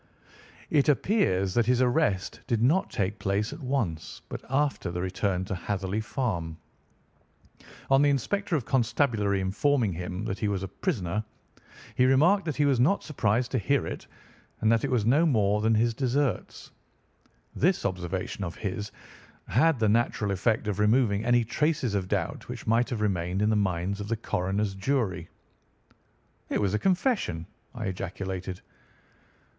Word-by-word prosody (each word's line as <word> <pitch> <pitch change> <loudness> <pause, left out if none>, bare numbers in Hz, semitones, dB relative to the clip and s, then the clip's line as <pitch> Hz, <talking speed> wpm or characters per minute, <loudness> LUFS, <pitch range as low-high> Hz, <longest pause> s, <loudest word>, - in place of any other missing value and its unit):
"It 145 -1 +3
appears 115 - +2
that 120 0 +2
his 125 0 +3
arrest 125 -7 +1
did 115 - +1
not 145 +12 +2
take 100 +2 -2
place 100 +5 -1
at 150 - -9
once, 120 - -3
but - - -6
after 135 -7 0
the 85 +1 -4
return 95 0 -1
to 95 - -4
Hatherley 95 +2 -2
Farm. 95 - -3 1.3
On 135 +1 +6
the 145 - +4
inspector 170 - 0
of 135 -7 -1
constabulary 115 -5 +1
informing 105 +3 +1
him 90 +4 -5
that 100 -2 -3
he 110 - 0
was 100 -2 -1
a - - -3
prisoner, 105 - -2 0.7
he 125 - +3
remarked 170 +10 +4
that 155 -4 -2
he 145 - +2
was 135 -4 +2
not 155 +11 +3
surprised 120 -4 0
to 130 - +1
hear 140 +5 +1
it, - - -6 0.5
and 110 - +3
that 115 -1 +2
it - - 0
was 120 -5 +1
no 140 +8 +4
more 105 -6 +2
than 110 +1 +3
his 115 +2 +2
deserts. 130 -2 -2 0.8
This 180 +5 +1
observation 95 +1 -3
of 85 -2 -4
his 105 +1 -4 0.6
had 165 -3 +3
the 110 -2 +2
natural 105 -1 +1
effect 110 +3 0
of 105 -1 -2
removing 105 -1 +3
any 120 0 +3
traces 130 0 0
of 95 -2 -1
doubt - - -2
which - - -7
might 115 +2 +2
have 115 -4 -3
remained 90 -3 0
in 105 - +3
the - - +2
minds 95 -1 -1
of 100 - -5
the 115 +1 -1
coroner's 100 0 -1
jury." 95 -5 -1 1.2
"It - - 0
was 100 -2 0
a 105 - +1
confession," 185 - 0 0.3
I 110 - -4
ejaculated. 95 -1 -5
110 Hz, 160 wpm, -27 LUFS, 95-130 Hz, 1.3 s, On